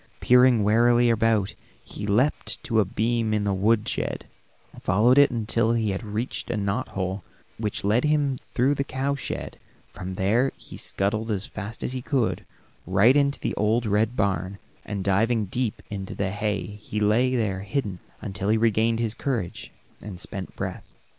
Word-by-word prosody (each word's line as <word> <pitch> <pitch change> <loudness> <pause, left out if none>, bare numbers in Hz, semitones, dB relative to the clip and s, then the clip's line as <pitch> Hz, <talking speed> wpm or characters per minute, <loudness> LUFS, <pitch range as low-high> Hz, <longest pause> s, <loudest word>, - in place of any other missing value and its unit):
Peering 125 -3 +5
warily 120 +3 +4
about 115 -3 +2 0.3
he 105 - -6
leaped 120 +9 +1
to 110 -2 +1
a 105 - +4
beam 110 +2 0
in 105 - 0
the 100 -1 +1
wood 105 +3 +2
shed, - - -2 0.6
followed 115 +8 +4
it 145 - +7
until 115 -1 +1
he 110 -3 +1
had 95 - -3
reached 110 +3 -4
a 110 - -1
knot 100 +5 -1
hole 95 0 -2 0.4
which 105 -2 -2
led 105 +5 +2 0.5
through 130 +3 +3
the 140 - -1
cow 140 0 -2
shed; 140 - -5 0.3
from 95 0 -6
there 110 +8 +2
he - - -11
scuttled 110 +3 -1
as 105 -2 -1
fast 110 +2 -7
as - - -2
he 130 - -3
could 125 -3 0 0.4
run, 95 - -5
right 115 +7 +6
into 140 -1 +2
the - - -2
old 110 +3 +1
red 110 +3 +1
barn, 100 -2 -1 0.3
and 100 -2 -4
diving 110 +3 +2
deep 115 +3 -3
into 95 -2 -5
the 95 -1 -1
hay 105 0 -1
he 105 +1 -6
lay 115 +5 +3
there 105 -5 0
hidden 100 -2 -3 0.2
until 95 +1 -3
he 110 - +4
regained 115 0 +2
his 115 -2 -1
courage 115 -7 -3 0.3
and 100 -4 -8
spent 95 -1 -6
breath. - - -4
110 Hz, 175 wpm, -25 LUFS, 100-120 Hz, 0.6 s, it